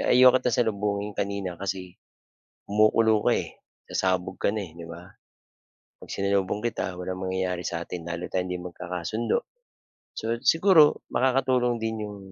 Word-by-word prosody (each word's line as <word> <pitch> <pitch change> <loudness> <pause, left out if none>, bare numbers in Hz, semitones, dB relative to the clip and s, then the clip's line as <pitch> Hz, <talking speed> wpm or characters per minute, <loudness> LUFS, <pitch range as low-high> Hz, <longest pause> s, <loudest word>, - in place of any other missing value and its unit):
"Ayaw 125 0 +6
kita 125 - -1
salubungin 105 -3 0
kanina 100 -2 -3
kasi, 95 -2 -4 0.7
kumukulo 110 +1 +4
ka, - - +5
eh, - - -4 0.3
sasabog 95 0 0
ka 100 - +1
na, 105 - -2
eh, 85 - -11
'di 85 - -8
ba? 85 +1 -9 1.0
'Pag - - -11
sinalubong 100 0 0
kita, 95 -6 -3
walang 95 +1 -4
mangyayari 95 -1 -1
sa'tin. 85 +1 -4
Lalo 85 +1 -4
tayong 90 -1 -1
hindi 90 - -2
magkakasundo." 90 +5 -3 0.7
So, 115 +1 -1
siguro 165 -3 +6 0.2
makakatulong 125 -1 +2
din 110 0 -1
'yong, 105 -1 -8
100 Hz, 140 wpm, -26 LUFS, 90-115 Hz, 1.0 s, Ayaw